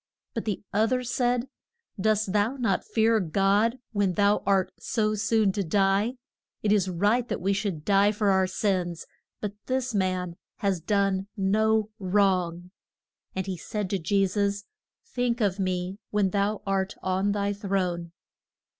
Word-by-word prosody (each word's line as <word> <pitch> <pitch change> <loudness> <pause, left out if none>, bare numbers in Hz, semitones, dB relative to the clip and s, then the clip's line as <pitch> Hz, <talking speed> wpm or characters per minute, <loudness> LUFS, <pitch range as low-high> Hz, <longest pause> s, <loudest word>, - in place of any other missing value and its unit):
But 230 - -3
the 210 -3 -2
oth 220 +3 +2
er 250 0 0
said, 245 +1 0 0.5
Dost 215 -1 +1
thou 210 +5 +2
not 245 -3 0
fear 225 0 +2
God 200 +6 +2
when 200 -4 +1
thou 205 +2 +3
art 195 -2 +2
so 215 -2 0
soon 220 -1 +2
to 200 +1 -2
die? 195 +6 +2 0.5
It 210 - +2
is 195 -3 +3
right 205 +7 +1
that - - -2
we 195 +3 +1
should 195 -7 -3
die 200 0 +4
for 210 -1 +1
our 190 -1 +3
sins, 185 -3 -1 0.4
but 205 -1 -3
this 260 -1 -1
man 185 -3 -1 0.2
has 195 -3 0
done 195 +1 +1
no 215 +2 +2
wrong. 180 -3 +1 0.6
And 190 -1 -2
he 190 -2 -4
said 205 +3 -4
to 195 - 0
Je 195 +4 +2
sus, 200 +1 -1 0.4
Think 245 - -1
of 200 -3 +1
me 185 +1 -2
when 205 -3 +1
thou 200 +1 0
art 195 0 -1
on 190 +2 +1
thy 200 0 0
throne. 185 -4 -2
200 Hz, 155 wpm, -27 LUFS, 190-215 Hz, 0.6 s, die